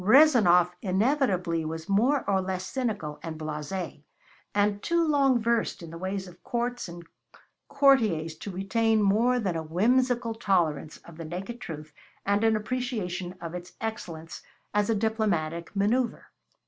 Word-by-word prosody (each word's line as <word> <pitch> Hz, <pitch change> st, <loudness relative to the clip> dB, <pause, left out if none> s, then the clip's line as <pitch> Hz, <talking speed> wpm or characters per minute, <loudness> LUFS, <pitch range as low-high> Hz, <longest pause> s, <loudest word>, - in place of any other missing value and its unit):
Rezanov 210 Hz, -, +6 dB
inevitably 190 Hz, -, +1 dB
was 160 Hz, +2 st, -5 dB
more 245 Hz, +8 st, +2 dB
or 190 Hz, -1 st, +2 dB
less 185 Hz, 0 st, -3 dB
cynical 210 Hz, -, -3 dB
and 160 Hz, -1 st, -6 dB
blase', 155 Hz, +4 st, -4 dB, 0.6 s
and 205 Hz, 0 st, +2 dB
too 340 Hz, -1 st, +1 dB
long 275 Hz, -4 st, +4 dB
versed 230 Hz, -5 st, 0 dB
in 165 Hz, -, -9 dB
the 165 Hz, -, -7 dB
ways 190 Hz, +1 st, -3 dB
of 175 Hz, 0 st, -15 dB
courts 240 Hz, -1 st, -2 dB
and 170 Hz, 0 st, -9 dB, 0.6 s
courtiers 225 Hz, -, +3 dB
to -, -, -7 dB
retain 215 Hz, +4 st, +1 dB
more 230 Hz, +5 st, +3 dB
than 190 Hz, -7 st, -1 dB
a 165 Hz, -, -1 dB
whimsical 235 Hz, +8 st, +1 dB
tolerance 170 Hz, -9 st, 0 dB
of 170 Hz, -2 st, -13 dB
the 165 Hz, -, -6 dB
naked 195 Hz, +9 st, -6 dB
truth 155 Hz, -2 st, -7 dB, 0.3 s
and 200 Hz, +2 st, +2 dB
an 225 Hz, -1 st, +4 dB
appreciation 210 Hz, -6 st, -3 dB
of 165 Hz, 0 st, -6 dB
its 180 Hz, 0 st, -7 dB
excellence 170 Hz, -7 st, -6 dB, 0.3 s
as 210 Hz, 0 st, +2 dB
a 225 Hz, -, +3 dB
diplomatic 200 Hz, -7 st, -1 dB
manoeuvre. 225 Hz, +4 st, +1 dB
200 Hz, 150 wpm, -27 LUFS, 170-235 Hz, 0.6 s, Rezanov